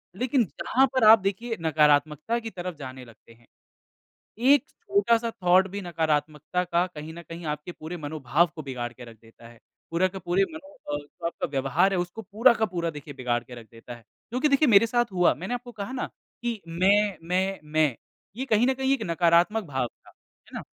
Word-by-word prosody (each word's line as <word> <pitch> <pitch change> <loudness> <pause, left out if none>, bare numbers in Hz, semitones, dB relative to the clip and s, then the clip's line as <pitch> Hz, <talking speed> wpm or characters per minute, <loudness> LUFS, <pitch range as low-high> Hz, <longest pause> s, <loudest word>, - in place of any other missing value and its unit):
लेक़िन 250 +4 +1
जहाँ 260 +8 +1
पर 260 -3 +2
आप 220 +1 +9
देखिए 215 +5 -3
नकारात्मकता 150 +6 +2
की 225 -1 -6
तरफ़ 180 -3 -6
जाने 130 -3 -9
लगते 115 0 -18
हैं। 115 0 -25 0.9
एक 270 +4 +5
छोटा-सा 235 - +1
थॉट 180 +2 +5
भी 200 +2 -5
नकारात्मकता 160 0 -1
का 175 0 +1
कहीं 160 -3 -9
न 170 - -9
कहीं 170 +1 -8
आपके 150 +3 -4
पूरे 165 +2 -7
मनोभाव 155 0 +1
को 155 - -5
बिगाड़ 125 -4 -5
के 125 +1 -12
रख 115 -1 -13
देता 115 +1 -16
है। 120 0 -17 0.3
पूरा 170 +3 +2
का 190 +1 -8
पूरे 180 +1 +1
मनो 295 -2 -11 0.2
अ, - - +1
जो 145 +3 -9
आपका 170 - -3
व्यवहार 140 +8 +2
है 190 - +1
उसको 175 +5 -4
पूरा 220 +5 +4
का 220 - 0
पूरा 170 -3 -2
देखिए 145 -1 -10
बिगाड़ 120 -2 -1
के 125 - -11
रख 120 -2 -11
देता 115 +1 -10
है। 120 - -15 0.3
क्योंकि 255 +6 +1
देखिए 280 +1 +4
मेरे 230 0 +6
साथ 240 -2 0
हुआ 180 -1 +3
मैंने 190 +8 -4
आपको 245 0 -7
कहा 210 +1 -6
ना 260 - -3 0.4
कि 235 -3 -2
मैं 195 +4 +2
मैं 190 +2 0
मैं 150 -3 +1 0.4
ये 260 - -3
कहीं 225 -1 +3
न 265 - +2
कहीं 265 +1 0
एक 260 - -4
नकारात्मक 175 +4 +3
भाव 135 -6 -2
था, - - -26
है - - -29
ना? - - -5
175 Hz, 205 wpm, -26 LUFS, 150-225 Hz, 0.9 s, आप